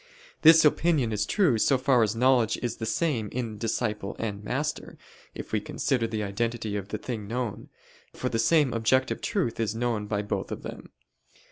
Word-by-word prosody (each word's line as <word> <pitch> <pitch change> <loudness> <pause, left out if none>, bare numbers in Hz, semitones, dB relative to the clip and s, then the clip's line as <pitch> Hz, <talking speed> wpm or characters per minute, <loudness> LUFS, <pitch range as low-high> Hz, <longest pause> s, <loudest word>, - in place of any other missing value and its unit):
This 160 0 +8
opinion 150 -5 +2
is 105 -1 -1
true 165 - +2
so 135 +4 +3
far 130 -1 +3
as 110 0 +1
knowledge 125 -1 +3
is 120 -1 -2
the 110 - -4
same 120 -8 0
in 115 -4 -4
disciple 105 -3 -2
and 105 -2 -4
master, 145 +8 -3 0.4
if - - -8
we - - 0
consider 120 -4 -1
the 110 -1 -3
identity 110 +1 -2
of 100 -2 -4
the 105 - -4
thing 110 -2 -5
known: 120 -1 -4 0.4
for 130 - -3
the 115 -2 -1
same 150 +1 +3
objective 125 +3 +1
truth 190 - -1
is 110 -1 -1
known 115 -3 -1
by 105 -1 -1
both 100 -2 -3
of - - -6
them. - - -8
115 Hz, 180 wpm, -27 LUFS, 105-130 Hz, 0.4 s, This